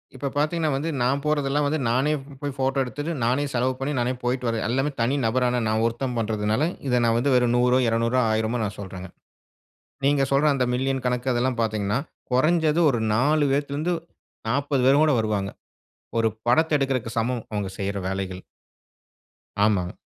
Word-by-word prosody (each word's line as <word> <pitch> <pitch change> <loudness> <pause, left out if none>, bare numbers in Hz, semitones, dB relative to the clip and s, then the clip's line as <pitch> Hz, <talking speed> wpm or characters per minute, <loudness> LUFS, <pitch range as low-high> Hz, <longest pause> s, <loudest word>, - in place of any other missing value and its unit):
இப்ப 135 +1 -3
பார்த்தீங்கன்னா 155 +1 +1
வந்து, 145 +5 -2
நான் 135 +3 +1
போறதெல்லாம் 145 -1 +1
வந்து, 155 +2 0
நானே 130 +6 +2 0.3
போய் 145 -1 -3
ஃபோட்டோ 135 +1 0
எடுத்துட்டு, 145 +6 -4
நானே 125 +5 +1
செலவு 125 +1 +1
பண்ணி, 135 +2 -2
நானே 120 +1 0
போய்ட்டு 125 0 -1
வருவேன். 115 -1 -1
எல்லாமே 135 +4 0
தனி 125 +4 +1
நபரான 125 +1 +1
நான் 110 0 +1
ஒருத்தன் 120 +2 -2
பண்றதுனால, 110 +1 0 0.3
இத 125 -1 +2
நான் 115 0 +3
வந்து 135 +3 +2
வெறும் 125 -1 +3
100ஓ, 125 +1 +3
200ஓ, 115 +2 +1
1000ஓ 110 +2 0
நான் 105 -1 -4
சொல்றேங்க. 95 -2 -7 1.0
நீங்க 140 0 +3
சொல்ற 140 +2 +4
அந்த 130 -2 +1
மில்லியன் 135 0 -1
கணக்கு 125 +1 0
அதெல்லாம் 125 0 0
பார்த்தீங்கன்னா, 105 -1 0 0.3
கொறஞ்சது 155 +4 +3
ஒரு 120 -4 -1
4 145 +6 +3
பேத்துல 140 0 -1
இருந்து 170 +4 0 0.5
40 140 +2 0
பேர் 140 +3 +5
கூட 155 -1 +4
வருவாங்க. 105 -3 -1 0.7
ஒரு 115 - +3 0.2
படத்த 155 +5 +3
எடுக்குறதுக்கு 130 -5 -2
சமம் 120 +1 -1
அவங்க 105 -2 -2
செய்ற 100 0 -2
வேலைகள். 95 -1 -4 1.2
ஆமாங்க. 95 -5 +1
125 Hz, 165 wpm, -24 LUFS, 115-140 Hz, 1.2 s, பேர்